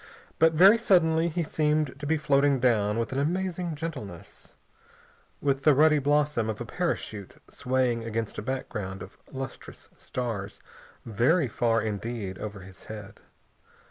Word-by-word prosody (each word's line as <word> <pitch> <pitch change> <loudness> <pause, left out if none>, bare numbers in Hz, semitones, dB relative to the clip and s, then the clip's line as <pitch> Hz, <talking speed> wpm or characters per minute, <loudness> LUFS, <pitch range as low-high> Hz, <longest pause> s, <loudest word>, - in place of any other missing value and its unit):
But 165 0 +5
very 195 +8 +7
suddenly 170 -6 +3
he 170 +1 -1
seemed 150 -2 0
to 145 - -5
be 160 +1 +2
floating 140 -2 +2
down 110 -4 +2
with 115 - -2
an 130 - -1
amazing 175 +2 -1
gentleness, 135 - -8 0.9
with 135 -1 +1
the 150 -1 +5
ruddy 155 +1 +5
blossom 145 -5 +1
of 110 - -4
a 120 - -4
parachute 110 - -3 0.2
swaying 125 -2 0
against 115 -1 -3
a - - -4
background 105 -6 -4
of 95 - -14
lustrous 135 -2 -8
stars 110 -6 -5 0.5
very 125 - +2
far 115 0 +1
indeed 105 -2 -4
over 105 -2 -6
his 95 0 -13
head. 105 -2 -9
130 Hz, 140 wpm, -27 LUFS, 110-155 Hz, 0.9 s, very